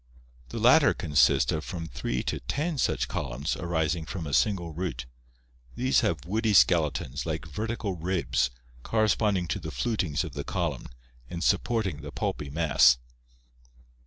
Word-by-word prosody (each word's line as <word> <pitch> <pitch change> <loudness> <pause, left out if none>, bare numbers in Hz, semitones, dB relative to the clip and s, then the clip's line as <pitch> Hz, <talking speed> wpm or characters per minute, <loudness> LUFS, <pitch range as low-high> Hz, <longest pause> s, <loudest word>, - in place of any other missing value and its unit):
The - - -6
latter 130 +6 +5
consists 75 -4 +3
of 80 - -2
from 85 -3 -5
three 65 -5 -3
to - - -2
ten 150 0 -2
such - - +1
columns 70 +1 -3
rising 80 -1 -1
from 90 -5 -5
a 70 - -5
single 90 -3 +1
root 75 -8 -4 0.7
These 130 +2 +2
have 85 - -1
woody 110 +3 +1
skeletons 75 -6 +2
like 80 0 -3
vertical 105 +5 -3
ribs 85 -7 0 0.3
corresponding 105 - +1
to - - -1
the - - -6
flutings 85 - -1
of - - -7
the - - -4
column - - -3 0.4
and 85 0 -4
supporting 100 -5 0
the 70 0 -8
pulpy 75 0 -3
mass. 70 -5 +4
85 Hz, 145 wpm, -27 LUFS, 75-105 Hz, 0.7 s, latter